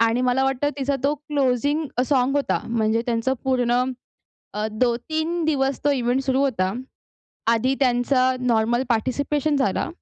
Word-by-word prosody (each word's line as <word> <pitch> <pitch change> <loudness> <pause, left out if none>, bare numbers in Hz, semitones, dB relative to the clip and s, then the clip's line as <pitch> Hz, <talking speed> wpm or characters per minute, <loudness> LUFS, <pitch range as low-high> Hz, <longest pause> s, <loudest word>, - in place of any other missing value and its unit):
आणि 230 +2 +2
मला 255 +2 +2
वाटतं 270 +1 0
तिचा 275 +1 0
तो 290 +2 +2
क्लोजिंग 290 0 0 0.2
सॉंग 270 0 +2
होता. 285 - 0
म्हणजे 225 0 +1
त्यांचं 235 +2 0
पूर्ण 250 -2 +2 0.7
अ, 210 +1 -1
दो 235 +2 +1
3 315 +6 -2
दिवस 270 -3 0
तो 290 - +3
इव्हेंट 255 -1 0
सुरू 265 0 +1
होता. 220 -9 0 0.8
आधी 255 +4 +1
त्यांचा 255 0 +2
नॉर्मल 240 0 +1
पार्टिसिपेशन 285 +5 0
झाला. 265 - 0
260 Hz, 145 wpm, -23 LUFS, 240-280 Hz, 0.8 s, तो